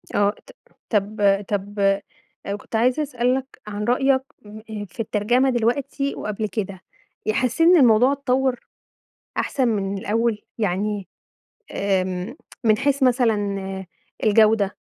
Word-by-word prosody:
آه، 205 Hz, 0 st, +4 dB, 0.2 s
ط -, -, -12 dB, 0.4 s
طب 210 Hz, 0 st, -1 dB, 0.3 s
طب 200 Hz, 0 st, +1 dB, 0.6 s
كنت -, -, -7 dB
عايزة 250 Hz, +6 st, +2 dB
أسألك 255 Hz, -1 st, 0 dB, 0.2 s
عن 210 Hz, 0 st, -4 dB
رأيك 260 Hz, +3 st, +3 dB, 0.7 s
في 180 Hz, -, -22 dB
الترجمة 240 Hz, +5 st, +2 dB
دلوقتي 265 Hz, +4 st, 0 dB
وقبل 215 Hz, 0 st, -3 dB
كده. 195 Hz, -1 st, -4 dB, 0.5 s
حسيت 250 Hz, -, 0 dB
إن 360 Hz, -, +7 dB
الموضوع 245 Hz, -1 st, +5 dB
اتطوَّر 265 Hz, -2 st, 0 dB, 0.8 s
أحسن 260 Hz, -3 st, 0 dB
من 200 Hz, -3 st, -1 dB
الأول؟ 220 Hz, +2 st, 0 dB, 0.2 s
يعني 205 Hz, -1 st, -1 dB, 0.6 s
آمم 190 Hz, +3 st, -1 dB, 0.3 s
من 215 Hz, -2 st, +4 dB
حيث 280 Hz, +2 st, +1 dB
مثلًا 245 Hz, -3 st, +3 dB, 0.9 s
الجودة، 215 Hz, -2 st, +4 dB
225 Hz, 110 wpm, -22 LUFS, 205-255 Hz, 0.9 s, إن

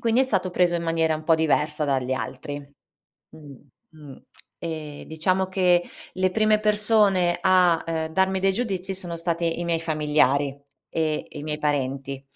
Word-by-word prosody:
quindi 230 Hz, +2 st, +2 dB
è -, -, +1 dB
stato 190 Hz, -7 st, -1 dB
preso 180 Hz, -1 st, +2 dB
in 170 Hz, -, -1 dB
maniera 165 Hz, -1 st, +1 dB
un 155 Hz, -, -6 dB
po' 165 Hz, -, +4 dB
diversa 150 Hz, -1 st, +1 dB
dagli 130 Hz, -2 st, 0 dB
altri. 135 Hz, +2 st, -5 dB, 0.7 s
Mh, 145 Hz, -3 st, -13 dB, 0.4 s
mh. 150 Hz, -4 st, -12 dB, 0.5 s
E 155 Hz, -3 st, -6 dB
diciamo 185 Hz, +4 st, 0 dB
che 180 Hz, -2 st, +3 dB, 0.3 s
le 185 Hz, 0 st, +1 dB
prime 215 Hz, +1 st, +2 dB
persone 210 Hz, -4 st, +3 dB
a, 180 Hz, -3 st, +4 dB
ehm, 160 Hz, -1 st, -2 dB
darmi 190 Hz, +1 st, +1 dB
dei 195 Hz, 0 st, +2 dB
giudizi 195 Hz, -4 st, -2 dB
sono 175 Hz, -2 st, -5 dB
state 170 Hz, 0 st, -2 dB
i 165 Hz, +1 st, -2 dB
miei 165 Hz, -1 st, 0 dB
familiari 150 Hz, -3 st, +2 dB, 0.4 s
e 155 Hz, -2 st, -1 dB
e -, -, -10 dB
i 145 Hz, -, -7 dB
miei 150 Hz, 0 st, -3 dB
parenti. 135 Hz, -2 st, -2 dB
165 Hz, 165 wpm, -24 LUFS, 150-185 Hz, 0.7 s, po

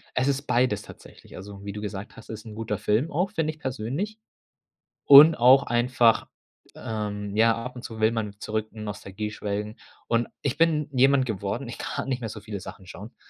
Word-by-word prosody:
Es 130 Hz, -, +1 dB
ist 140 Hz, -1 st, +1 dB
beides 120 Hz, -6 st, +1 dB
tatsächlich. -, -, -14 dB
Also, 100 Hz, +1 st, -10 dB
wie 100 Hz, -, -5 dB
du 105 Hz, +1 st, -7 dB
gesagt 105 Hz, 0 st, -7 dB
hast, 110 Hz, -, -13 dB
ist 110 Hz, 0 st, -8 dB
'n 110 Hz, -, -9 dB
guter 110 Hz, -2 st, -3 dB
Film 105 Hz, -, 0 dB
auch, 180 Hz, +6 st, 0 dB
finde 160 Hz, -5 st, -1 dB
ich 155 Hz, -, -21 dB
persönlich. 135 Hz, -, -4 dB, 0.9 s
Und 150 Hz, +3 st, +10 dB
auch 130 Hz, +3 st, +6 dB
einfach 120 Hz, -2 st, +2 dB, 0.5 s
ähm, 105 Hz, -2 st, -4 dB
ja, 115 Hz, +1 st, +4 dB
ab 125 Hz, +2 st, -7 dB
und 125 Hz, -, -8 dB
zu 110 Hz, -1 st, -8 dB
will 110 Hz, +1 st, +3 dB
man 105 Hz, -3 st, -3 dB
zurück 110 Hz, +1 st, -3 dB
in 110 Hz, -1 st, -9 dB
Nostalgie 105 Hz, 0 st, -5 dB
schwelgen. 105 Hz, +1 st, -4 dB, 0.3 s
Und 115 Hz, 0 st, +1 dB, 0.2 s
ich 140 Hz, -3 st, 0 dB
bin 155 Hz, -3 st, +2 dB
jemand 135 Hz, +1 st, +4 dB
geworden, 110 Hz, +3 st, -3 dB
ich 115 Hz, -, -8 dB
kann -, -, -4 dB
nicht 130 Hz, -, -1 dB
mehr 115 Hz, -3 st, -5 dB
so 105 Hz, -, -8 dB
viele 105 Hz, -2 st, -6 dB
Sachen 95 Hz, 0 st, -10 dB
schauen. 105 Hz, +6 st, -10 dB
115 Hz, 200 wpm, -25 LUFS, 105-130 Hz, 0.9 s, Und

